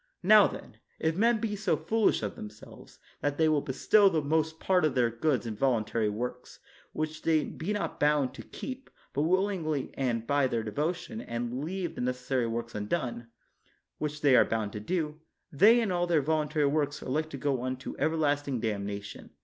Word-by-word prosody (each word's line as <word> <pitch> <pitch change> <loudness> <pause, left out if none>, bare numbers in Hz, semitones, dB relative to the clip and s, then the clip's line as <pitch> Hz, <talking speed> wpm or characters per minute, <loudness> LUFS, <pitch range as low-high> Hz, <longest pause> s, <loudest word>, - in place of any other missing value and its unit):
Now, 210 +2 +7
then, - - -10 0.2
if 160 0 0
men 230 +3 +3
be 215 -2 -2
so 205 - 0
foolish 225 - +1
of 105 - -3
themselves, 105 +1 -11 0.2
that 145 0 -1
they 160 - +4
will 155 -2 +3
bestow 195 +11 +4
the 165 - +1
most 160 +2 0
part 185 -1 +2
of 150 -4 +1
their 120 -2 +3
goods 125 +2 0
in 110 -2 -4
voluntary 110 -3 +1
works, 125 +4 -5 0.3
which 155 0 -4
they 160 -2 +2
be 170 +6 -5
not 205 -1 -3
bound 145 -3 +2
to - - -9
keep, 265 0 -8 0.2
but 140 - 0
willingly 170 -4 0
and 120 -4 -1
by 140 +1 +2
their 115 -3 -1
devotion, 165 - -3
and 120 - -4
leave 180 +1 -3
the - - -6
necessary 125 0 -1
works 115 0 -4
undone, 120 +2 -3 0.7
which 150 0 -3
they 140 -3 +5
are - - +7
bound 110 -2 -2
to 105 - -4
do, 155 - -2 0.3
they 210 - +6
and 215 -4 0
all 175 0 +1
their 165 -4 +2
voluntary 150 0 +1
works 145 0 0
are - - -6
like 155 +4 -1
to 140 - -6
go 135 -2 -1
unto 130 +1 -4
everlasting 145 -4 0
damnation. 100 -2 -4
145 Hz, 185 wpm, -29 LUFS, 120-165 Hz, 0.7 s, Now